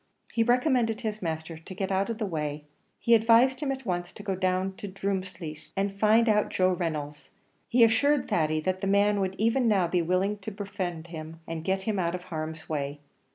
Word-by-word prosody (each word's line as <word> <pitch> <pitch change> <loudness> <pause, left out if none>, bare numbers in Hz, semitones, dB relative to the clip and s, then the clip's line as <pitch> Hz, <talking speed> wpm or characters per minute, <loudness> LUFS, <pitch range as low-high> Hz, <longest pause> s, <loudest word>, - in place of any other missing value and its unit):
He 230 - +1
recommended 240 -1 +2
his 215 -2 -3
master 160 -1 -4
to 175 +3 -10
get 195 +1 -2
out 195 +3 +1
of 230 - -2
the 215 - -1
way; 150 -4 -3 0.4
he 235 - +3
advised 230 +3 +5
him 290 -3 -1
at 265 -1 -5
once 175 -3 -2
to 205 - -10
go 195 -2 -1
down 185 0 0
to 205 - -6
Drumleesh 185 -5 -4
and 195 0 -1
find 220 +2 +5
out 210 -1 +3
Joe 185 0 +2
Reynolds; 150 -5 -3 0.4
he 240 0 +5
assured 285 +5 +3
Thady 155 -1 +1
that 185 +3 -1
the 195 - -1
man 200 +1 +3
would 190 -1 -1
even 230 +3 +2
now 195 -5 +3
be 175 +1 +1
willing 185 +4 0
to 205 - -6
befriend 195 -5 -4
him 160 0 -7
and 165 -1 -5
get 190 +2 0
him 210 -1 -1
out 170 0 0
of 180 - -7
harm's 160 -2 -5
way. 145 -1 -3
190 Hz, 205 wpm, -28 LUFS, 170-215 Hz, 0.4 s, advised